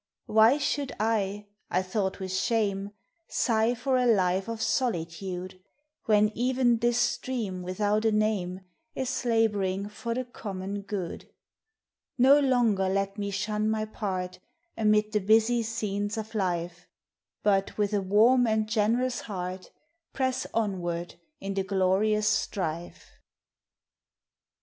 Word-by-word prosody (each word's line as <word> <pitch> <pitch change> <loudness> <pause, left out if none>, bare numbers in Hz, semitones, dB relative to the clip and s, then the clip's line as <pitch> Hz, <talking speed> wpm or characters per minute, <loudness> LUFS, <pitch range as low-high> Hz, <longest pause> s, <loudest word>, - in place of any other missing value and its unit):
why 220 +5 +5
should 285 -1 -1
I, 210 -2 0 0.2
I 185 +1 +1
thought 190 +1 -2
with 190 -1 -4
shame, 200 -1 0 0.4
Sigh 225 +1 +1
for 255 +2 0
a 250 -1 +2
life 190 -3 +2
of 230 -1 -4
solitude, 185 -5 -2 0.4
When 210 -1 +4
even 245 -1 +2
this 240 0 +2
stream 225 -8 -1
without 205 +4 0
a 220 - +4
name 205 -4 0 0.3
Is 260 -1 -2
laboring 205 -4 +1
for 230 +2 -4
the 255 0 -2
common 200 -4 -5
good. 195 -3 -5 0.9
]No 270 +3 +7
longer 235 -8 +2
let 195 +1 -1
me 200 0 -2
shun 210 +2 -1
my 215 0 0
part 185 -4 -4 0.4
Amid 215 -1 +2
the 210 - +2
busy 220 +4 +3
scenes 210 -2 -2
of 220 +1 -5
life, 175 -3 -2 0.6
But 195 -2 +1
with 210 0 0
a 205 - +2
warm 225 +6 +4
and 220 -1 +1
generous 230 +4 +1
heart 185 -3 -6 0.4
Press 260 -1 -1
onward 175 -6 -2 0.3
in 195 0 -4
the 195 - 0
glorious 200 +2 +2
strife. 175 -5 -3
210 Hz, 125 wpm, -28 LUFS, 190-225 Hz, 0.9 s, No